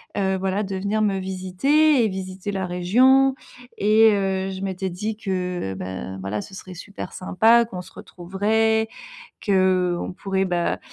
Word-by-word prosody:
Heu, 190 Hz, -1 st, 0 dB
voilà 190 Hz, +2 st, -1 dB
de 195 Hz, -1 st, -4 dB
venir 200 Hz, +3 st, -1 dB
me 200 Hz, -2 st, +1 dB
visiter 190 Hz, +11 st, +2 dB
et -, -, +3 dB
visiter 190 Hz, 0 st, -5 dB
la 190 Hz, -2 st, -3 dB
région 255 Hz, +10 st, +4 dB, 0.5 s
et 215 Hz, +2 st, +5 dB
heu, 195 Hz, -1 st, -1 dB
je 190 Hz, 0 st, -7 dB
m'étais 190 Hz, 0 st, -3 dB
dit 210 Hz, +5 st, -4 dB
que: 180 Hz, -, -3 dB
«Bah, 95 Hz, +1 st, -6 dB
voilà, 100 Hz, +2 st, -3 dB
ce 195 Hz, -, -12 dB
serait 185 Hz, -1 st, -9 dB
super 200 Hz, +4 st, -8 dB
sympa, 225 Hz, +6 st, +3 dB
qu'on 185 Hz, -6 st, -7 dB
se -, -, -14 dB
retrouverait, 220 Hz, +5 st, 0 dB, 0.6 s
qu'on 185 Hz, -3 st, +1 dB
pourrait, 195 Hz, -1 st, -1 dB
bah, 175 Hz, -2 st, -1 dB
190 Hz, 155 wpm, -23 LUFS, 185-215 Hz, 0.6 s, et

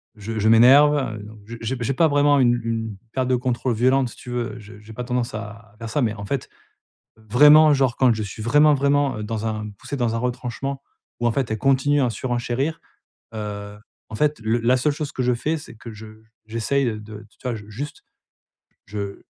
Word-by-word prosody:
je 110 Hz, +1 st, -5 dB
je 110 Hz, +1 st, +2 dB
m'énerve, 130 Hz, +1 st, +5 dB
donc 110 Hz, +1 st, -12 dB
j'ai 115 Hz, +2 st, -8 dB
j'ai 115 Hz, +3 st, -2 dB
j'ai 115 Hz, +3 st, 0 dB
pas 165 Hz, +4 st, +3 dB
vraiment 145 Hz, -1 st, +3 dB
une 120 Hz, -2 st, +4 dB
une 115 Hz, -2 st, -3 dB, 0.2 s
perte 130 Hz, -1 st, -1 dB
de 130 Hz, -, +2 dB
contrôle 125 Hz, 0 st, -1 dB
violente, 130 Hz, +2 st, +2 dB
si -, -, -13 dB
tu -, -, -11 dB
veux. 120 Hz, 0 st, -3 dB
Je 105 Hz, -1 st, -13 dB
j'ai 105 Hz, +1 st, -13 dB
pas 125 Hz, -, -5 dB
tendance 125 Hz, 0 st, -2 dB
à 110 Hz, -1 st, -9 dB
faire 115 Hz, -1 st, -6 dB
ça. 145 Hz, +6 st, 0 dB
Mais 115 Hz, -4 st, +1 dB
en 100 Hz, -1 st, -7 dB
fait, 135 Hz, +5 st, -3 dB, 0.7 s
vraiment 150 Hz, +8 st, +6 dB
genre, 135 Hz, -3 st, +1 dB
quand 130 Hz, -3 st, +4 dB
je 110 Hz, -, -4 dB
suis 105 Hz, +2 st, -8 dB
vraiment 150 Hz, +6 st, +5 dB
vraiment 140 Hz, -4 st, +1 dB
dans 110 Hz, 0 st, -4 dB
un 110 Hz, -1 st, -4 dB
poussé 140 Hz, -, -6 dB
dans 120 Hz, -3 st, 0 dB
un -, -, 0 dB
retranchement 125 Hz, +2 st, -4 dB, 0.4 s
ou 120 Hz, -, +1 dB
en -, -, +2 dB
fait, 130 Hz, -3 st, -1 dB
elle 110 Hz, -, -1 dB
continue 135 Hz, +4 st, +2 dB
à 125 Hz, -, +1 dB
surenchérir, 125 Hz, +6 st, -2 dB, 0.6 s
heu, 105 Hz, -1 st, -6 dB, 0.3 s
en 110 Hz, -, -7 dB
fait, 150 Hz, +5 st, +1 dB
le 110 Hz, +2 st, 0 dB
la 120 Hz, +2 st, +3 dB
seule 140 Hz, +4 st, +1 dB
chose 150 Hz, 0 st, -5 dB
que -, -, -3 dB
je 125 Hz, 0 st, +2 dB
fais, 155 Hz, +7 st, -1 dB
c'est 145 Hz, -, -11 dB
que 115 Hz, 0 st, -10 dB
je 110 Hz, +1 st, -11 dB, 0.4 s
j'essaie 115 Hz, +5 st, 0 dB, 0.2 s
de, 105 Hz, 0 st, -10 dB
t 110 Hz, -, -15 dB
tu -, -, -30 dB
vois, 125 Hz, -2 st, -2 dB
juste 140 Hz, +8 st, -7 dB, 0.8 s
je 100 Hz, 0 st, -6 dB
120 Hz, 210 wpm, -22 LUFS, 110-135 Hz, 0.8 s, vraiment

